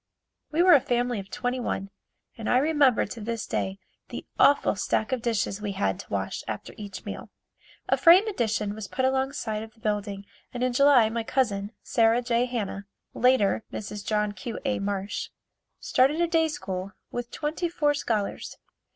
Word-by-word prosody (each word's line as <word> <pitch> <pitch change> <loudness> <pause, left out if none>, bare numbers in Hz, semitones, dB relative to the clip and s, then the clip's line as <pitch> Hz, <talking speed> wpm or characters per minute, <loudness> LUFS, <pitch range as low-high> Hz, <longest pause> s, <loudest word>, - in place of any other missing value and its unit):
We 325 +3 +3
were 365 -1 +7
a 290 - +8
family 245 -2 0
of 195 0 -9
twenty 245 +5 -2
one 195 -5 -3 0.4
and 225 - -4
I 245 - +4
remember 285 -3 +3
to 225 +2 -8
this 230 +1 -3
day 190 0 -2 0.3
the - - -7
awful 285 -6 +5
stack 215 +3 -1
of 255 -2 0
dishes 225 -3 -1
we 205 -2 -3
had 95 - -1
to - - -10
wash 95 -1 -3
after 110 -2 -5
each 200 -3 -8
meal. 205 - -7 0.6
A - - +3
frame 365 +6 +7
addition 215 - -1
was 215 -1 -7
put 260 - -1
along 265 +1 +1
side 215 -6 -3
of 220 0 -10
the - - -24
building 205 -2 -2 0.3
and 245 - -2
in 255 -1 +1
July 275 -3 +6
my 230 +1 -2
cousin, 210 -4 -1
Sarah 230 +1 +3
J. 240 0 +2
Hanna 205 -5 -4 0.3
(later 240 -4 +3
Mrs. 210 -1 -6
John 210 -1 0
Q. 205 +3 -6
A. 265 -2 0
Marsh) 200 0 -3 0.5
started 275 +5 +2
a 345 - +4
day 325 -1 +2
school 190 -10 -5 0.2
with 240 0 -4
twenty 315 +3 -2
four 295 -4 +1
scholars. 220 -8 -2
230 Hz, 180 wpm, -26 LUFS, 205-260 Hz, 0.6 s, a